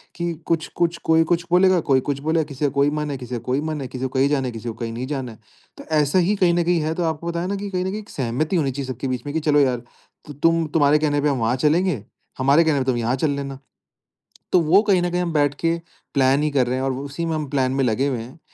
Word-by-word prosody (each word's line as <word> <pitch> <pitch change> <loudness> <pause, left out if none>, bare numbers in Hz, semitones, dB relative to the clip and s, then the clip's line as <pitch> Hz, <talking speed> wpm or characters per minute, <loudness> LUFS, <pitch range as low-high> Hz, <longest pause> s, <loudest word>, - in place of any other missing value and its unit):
कि 170 0 -2
कुछ-कुछ 170 +1 0
कोई 160 0 +4
कुछ 170 0 +2
बोलेगा 185 0 +5
कोई 135 -1 +5
कुछ 140 +1 -3
बोलेगा, 160 +2 +1
किसी 145 -1 -4
का - - +3
कोई 140 +1 +2
मन 150 0 -3
है, 140 - -3
किसी 125 -1 -6
का - - -3
कोई 130 +3 0
मन 155 -1 -3
है, 130 - -4
किसी 130 +1 -6
को 130 - -1
कहीं 135 +1 +2
जाना 140 -3 0
है, - - -3
किसी 115 0 -8
को - - -4
कहीं 115 -1 -5
नहीं 125 +3 -4
जाना 135 -4 -4
है। 110 - -15 0.4
तो - - -9
ऐसा 150 +4 +3
ही 185 +4 +2
कहीं 180 -3 +3
न 175 0 +2
कहीं 175 0 +2
है 155 +1 -1
तो 175 - -1
आपको 160 0 -2
पता 170 0 -2
है 180 - -2
ना 200 - -2
कि 200 0 -5
कहीं 180 -2 -1
न - - -1
कहीं 205 +3 -4
एक 210 - -12
सहमति 135 +7 -2
होनी 145 -6 +1
चाहिए 135 0 -5
सबके 130 +1 -4
बीच 130 +1 -3
में 145 - -5
कि - - +2
चलो 145 0 +5
यार 125 -4 +1 0.5
त - - -6
तुम 165 0 +3
तुम्हारे 150 -1 +4
कहने 145 -1 +1
पे 150 - +2
हम 140 - 0
वहाँ 115 +2 +1
चलेंगे। 150 - +1 0.3
हमारे 140 +5 +4
कहने 155 -3 +2
पे 130 - -1
तुम 130 -2 +1
यहाँ 120 +2 0
चल 145 +2 0
लेना। 140 -1 -5 0.9
तो 180 - +5
वो 170 +5 +5
कहीं 200 -4 +2
न 175 - 0
कहीं 180 0 0
हम 175 -1 -2
बैठ 145 -2 +2
के 165 0 +1 0.4
प्लान 135 +1 +3
ही 150 - +1
कर 130 -3 +2
रहे 125 - 0
हैं 130 - -2
और 135 0 0
उसी 140 +4 -4
में 165 - -1
हम 155 -2 -3
प्लान 130 -2 +1
में 135 0 +1
लगे 125 +3 +1
हुए 135 -3 -1
हैं 120 +7 -10
145 Hz, 300 wpm, -22 LUFS, 130-165 Hz, 0.9 s, बोलेगा